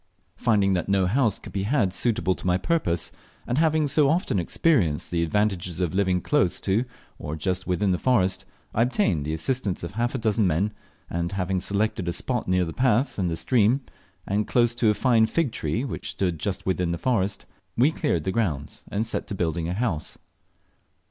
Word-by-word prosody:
Finding 100 -5 +2
that 90 0 -1
no 95 -1 +3
house 110 +1 +2
could - - -12
be 100 - -1
had 105 -3 +1
suitable 105 -3 +1
to 90 - -7
my 90 0 +3
purpose, 95 - 0 0.3
and 125 +4 0
hawing 155 -2 +3
so 140 0 +3
often 160 - +1
experienced 90 - +1
the 85 -1 +1
advantages 90 -1 0
of 90 -4 0
living 95 -2 +1
close 145 -12 +1
to 100 +6 +1 0.3
or 75 +2 -4
just 90 +4 -2
within 95 +2 +1
the 90 - 0
forest, 95 -7 +2 0.3
I 115 - +1
obtained 115 - +1
the 80 - -2
assistance 100 +2 -2
of 85 - -4
half 120 +5 -1
a - - +1
dozen 110 -3 +1
men; 95 +6 0 0.3
and 85 +2 -3
having 95 -1 -1
selected 100 -1 -1
a 85 - 0
spot 125 +4 -2
near 90 -1 +2
the 80 - -5
path 130 -1 +1
and 90 -2 +1
the 80 - -1
stream, 120 +4 +3 0.4
and 105 +2 0
close 120 -1 +3
to 120 -2 +2
a 105 - +2
fine 115 0 +3
fig 155 +1 0
tree, 115 +2 -2
which 140 - -4
stood 90 -5 -1
just 95 +5 -3
within 90 -2 0
the 85 - -1
forest, 100 -4 0 0.3
we 130 +6 +5
cleared 85 - -1
the 95 - -1
ground 85 -10 -2
and 105 +3 -1
set 115 - -3
to 100 - -4
building 85 -2 -1
a - - -1
house. 100 -9 -2
100 Hz, 200 wpm, -25 LUFS, 90-120 Hz, 0.4 s, we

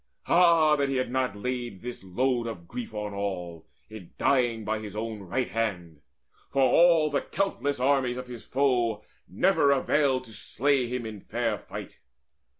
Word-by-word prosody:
Ah 170 -3 +5
that 140 -1 0
he 135 - -1
had 130 -2 -1
not 130 -5 0
laid 120 -2 -4
this 125 -4 -6
load 120 +5 0
of 85 -7 -7
grief 120 +3 -6
On 105 -1 -5
all, 90 -5 -4 0.2
in 105 -5 -11
dying 120 -5 +1
by 110 +1 -1
his 105 -1 -8
own 110 0 -4
right 100 +7 -2
hand! 90 -9 -3 0.5
For 135 - +2
all 165 +1 +5
the 140 - +1
countless 145 -9 -2
armies 130 -2 +2
of 125 - -5
his 120 -3 -9
foes 120 -5 +1 0.2
Never 170 -6 +3
availed 135 -1 +2
to 115 -3 -14
slay 130 +4 0
him 125 -1 -4
in 105 -3 -7
fair 115 -1 -2
fight." - - -9
120 Hz, 165 wpm, -27 LUFS, 105-135 Hz, 0.5 s, Ah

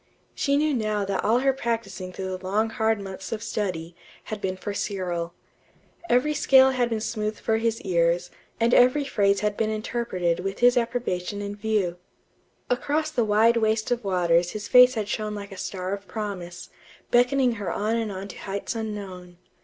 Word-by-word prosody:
She 280 0 +1
knew 305 0 +2
now 215 -4 0
that 195 -1 -2
all 230 +4 +3
her 270 0 +3
practising 225 -7 -3
through 190 0 -4
the 185 - -11
long 215 +4 0
hard 220 -1 +1
months 190 -1 -7
of 225 -1 -3
study, 175 -7 -3 0.3
had 215 -1 -6
been 185 -1 -2
for 205 +2 -5
Cyril. 175 -4 -3 0.7
Every 260 +5 +3
scale 265 -2 +6
had 250 -2 +1
been 225 -2 -1
smoothed 215 -1 -3
for 220 - +1
his 225 0 0
ears, 175 -2 +1 0.3
and 235 +1 +3
every 255 +4 +5
phrase 200 -6 +2
had 210 -1 0
been 220 0 0
interpreted 215 -6 -1
with 195 +2 -3
his 245 +1 +5
approbation 230 -6 -1
in 205 0 -4
view. 205 -4 -1 0.7
Across 300 +5 0
the 250 -6 +1
wide 220 +2 +4
waste 220 0 +1
of 245 -1 0
waters 175 -3 +2
his 215 -1 -5
face 250 0 +7
had 215 -2 -2
shone 210 0 -3
like 200 0 -7
a - - -8
star 185 0 -4
of 200 0 -6
promise, 180 -4 -6 0.4
beckoning 250 +1 +4
her 195 - -2
on 215 +2 0
and 225 -2 -1
on 195 +1 -6
to - - -9
heights 200 0 -4
unknown... 195 -5 -6
210 Hz, 185 wpm, -25 LUFS, 190-235 Hz, 0.7 s, face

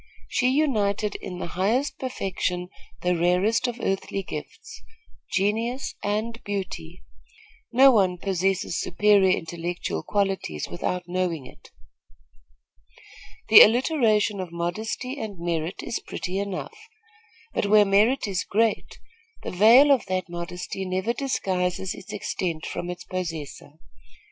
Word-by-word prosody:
She 250 - +1
united 215 -8 +1
in 185 -3 -7
the - - -4
highest 225 +11 -1
perfection 180 -7 -3 0.3
the 180 0 +2
rarest 180 +8 +2
of 245 0 -5
earthly 195 0 -2
gifts 445 - -8 0.5
genius 225 +6 -1
and 220 +3 -2
beauty. 185 -4 -5 0.7
No 265 +3 +7
one 190 -6 +2
possesses 190 -1 -1
superior 200 +1 +3
intellectual 170 - -4
qualities 195 - -2
without 180 - -3
knowing 175 -5 -2
it. - - -15 1.8
The - - +11
alliteration 225 -4 +4
of 185 -2 -5
modesty 215 +10 -4
and 210 -5 -5
merit 170 0 -3
is - - -3
pretty 185 +1 -4
enough; 200 -2 -5 0.7
but - - 0
where 210 0 +6
merit 215 +6 +3
is 190 -3 -1
great, 225 +1 0 0.5
the - - -4
veil 230 +10 +7
of 255 -8 +3
that 185 -1 -2
modesty 180 +2 -5
never 190 +5 -1
disguises 190 -8 -1
its - - -11
extent 165 -4 -3
from 175 - -4
its 180 0 -6
possessor. 165 -6 -6
195 Hz, 120 wpm, -25 LUFS, 180-225 Hz, 1.8 s, The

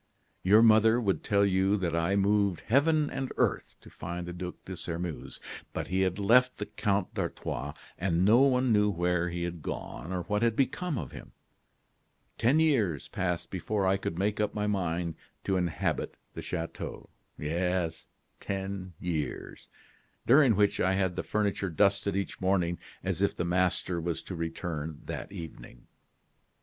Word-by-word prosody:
"Your 105 +4 +6
mother 110 +1 +6
would 100 -5 0
tell 100 -1 +3
you 95 +1 +2
that 85 -4 -1
I 85 +4 +1
moved 100 -2 +2
heaven 150 +5 +3
and 135 -1 -3
earth - - 0
to - - -14
find 85 +1 -5
the 90 - -6
Duc 90 0 -5
de 95 - -6
Sairmeuse. 85 -1 -5 0.3
But - - -4
he 95 +1 +1
had 95 -1 +1
left 125 +5 +4
the 105 - -3
Count 100 -3 -1
d'Artois, - - -3 0.2
and 90 0 +2
no 110 +4 +6
one 130 -3 +4
knew 105 0 +4
where 90 -1 0
he 85 0 -3
had 85 -2 -4
gone 80 - -5
or 90 -1 -2
what 105 +4 -1
had 115 -1 +2
become 150 +4 0
of - - -5
him. - - -11 1.1
Ten 125 +7 +4
years 115 - +2
passed 90 -2 -2
before 100 +2 -1
I 95 +1 +4
could 85 -3 -4
make 105 +3 0
up 105 - 0
my 105 0 0
mind 90 -5 -1 0.3
to 95 - 0
inhabit 90 -4 -1 0.2
the - - -6
chateau 85 -2 -5 0.3
yes, 85 +2 -1 0.3
ten 95 -1 -4
years 80 -5 -4 0.6
during 130 -2 +6
which 105 0 +2
I 95 +1 +3
had 95 -2 0
the - - -1
furniture 100 -2 -1
dusted 100 +3 +2
each 100 0 -3
morning 90 -2 +1 0.2
as - - -2
if - - +2
the 85 - -2
master 90 0 +1
was 80 -1 -3
to 95 - -6
return 80 -2 -4
that - - -5
evening. 80 -9 -9
95 Hz, 165 wpm, -29 LUFS, 85-105 Hz, 1.1 s, Your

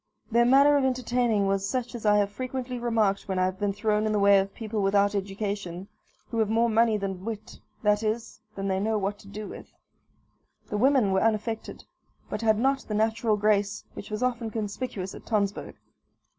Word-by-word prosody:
Their 235 +1 +4
manner 280 +3 +6
of 280 - +1
entertaining 245 -4 +1
was 195 0 0
such 250 0 -2
as 230 -3 -4
I 210 0 +5
have 205 -1 +1
frequently 255 +2 -4
remarked 220 -4 +1
when 190 -1 -2
I 185 - +3
have 185 +1 -3
been 205 -1 +1
thrown 215 +1 0
in - - 0
the - - +2
way 200 0 +6
of 195 +1 -2
people 220 -1 -4
without 200 +1 +3
education, 195 -2 -4 0.4
who 230 - -1
have 220 -2 +2
more 230 +1 +2
money 225 0 +3
than 190 -2 -4
wit 220 -1 -6 0.2
that 210 0 +3
is, 220 0 -3
than 195 0 -3
they 190 -1 0
know 215 +2 0
what 200 0 -2
to - - -15
do 210 +1 -7
with. - - -10 1.0
The 210 - -2
women 255 -3 +3
were 190 0 +2
unaffected, 225 0 -1 0.5
but 210 - -3
had 220 -2 +3
not 270 +4 +2
the 215 - -2
natural 220 0 +1
grace 205 -1 +1
which - - -9
was 215 +3 -3
often 235 -3 -1
conspicuous 205 -2 -4
at - - -11
Tonsberg. 205 -3 -1
215 Hz, 200 wpm, -27 LUFS, 200-230 Hz, 1.0 s, manner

